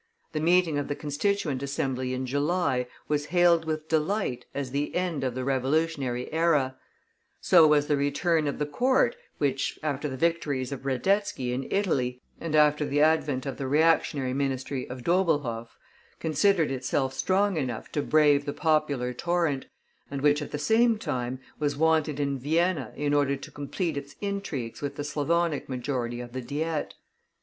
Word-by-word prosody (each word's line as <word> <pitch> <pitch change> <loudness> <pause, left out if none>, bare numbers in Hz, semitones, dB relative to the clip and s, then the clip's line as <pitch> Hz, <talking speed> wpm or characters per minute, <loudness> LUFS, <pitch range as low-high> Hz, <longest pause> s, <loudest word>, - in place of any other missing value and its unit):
The 155 - -2
meeting 165 -2 +3
of 145 - -3
the 145 - -2
Constituent 150 0 -1
Assembly 135 -2 -2
in 130 +1 -3
July 145 -1 0 0.2
was 145 -1 -1
hailed 175 -1 +4
with 155 0 -3
delight 160 - -1
as 140 -3 -4
the 145 +2 -2
end 175 -6 -1
of 130 -2 -1
the 130 - -2
revolutionary 135 -1 0
era; 150 -5 +2 0.6
so 170 -4 +6
was 150 -1 +4
the 145 - +2
return 155 +3 +1
of 140 - -2
the 150 - -1
Court, 255 - +2 0.2
which, 135 -2 -1
after 150 -1 -2
the 130 - -5
victories 145 -5 0
of 135 0 -6
Radetzky 135 -2 0
in 130 +1 -3
Italy, 130 -11 0 0.2
and 160 -2 -2
after 150 0 +4
the 145 0 0
advent 150 -4 +2
of 135 - -4
the 135 - -3
reactionary 145 -3 +2
ministry 135 -1 -2
of 125 0 -7
Doblhoff, 145 -10 0 0.4
considered 165 0 +2
itself 130 0 -1
strong 190 +8 +1
enough 130 -6 -3
to 145 - 0
brave 145 -2 +4
the 145 - -3
popular 150 -6 +1
torrent, 165 -2 0 0.4
and 140 -1 -4
which, 145 +1 +3
at 145 - -5
the - - -4
same 225 +8 +3
time, 125 - -3 0.2
was 145 -1 -1
wanted 155 -2 +2
in 140 -1 -1
Vienna 160 -2 0
in 145 0 -1
order 140 -1 +2
to 135 - -10
complete 155 +3 -3
its 140 0 -6
intrigues 195 - -4
with 140 -1 -3
the 145 - -4
Slavonic 150 +2 0
majority 125 -2 -3
of 120 0 -9
the 130 - -3
Diet. 150 +4 -3
145 Hz, 165 wpm, -27 LUFS, 135-160 Hz, 0.6 s, so